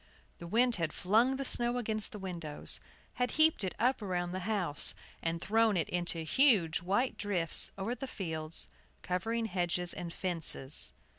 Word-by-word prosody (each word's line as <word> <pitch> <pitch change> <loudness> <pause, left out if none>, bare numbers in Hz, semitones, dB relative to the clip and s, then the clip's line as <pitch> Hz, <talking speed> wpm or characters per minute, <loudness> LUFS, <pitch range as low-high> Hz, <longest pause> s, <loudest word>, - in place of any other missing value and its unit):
The 170 - -8
wind 235 +5 +3
had 165 -3 -2
flung 225 +8 +2
the 275 +1 -4
snow 240 -1 +1
against 215 -3 -1
the - - -7
windows, 170 -6 -5 0.4
had 250 - +2
heaped 315 -7 +4
it 185 - -3
up 250 +1 +1
around 175 -3 -2
the 185 - -3
house, 180 -9 +2 0.3
and 165 0 -2
thrown 220 +2 +2
it 165 - 0
into 175 -2 -2
huge 185 - +3
white 205 +9 0
drifts 185 -6 +1
over 195 +5 -2
the 270 +2 -6
fields, 160 -7 -4 0.4
covering 225 +6 -2
hedges 180 -3 +2
and 175 -1 -6
fences. 160 - +2
190 Hz, 160 wpm, -32 LUFS, 170-230 Hz, 0.4 s, heaped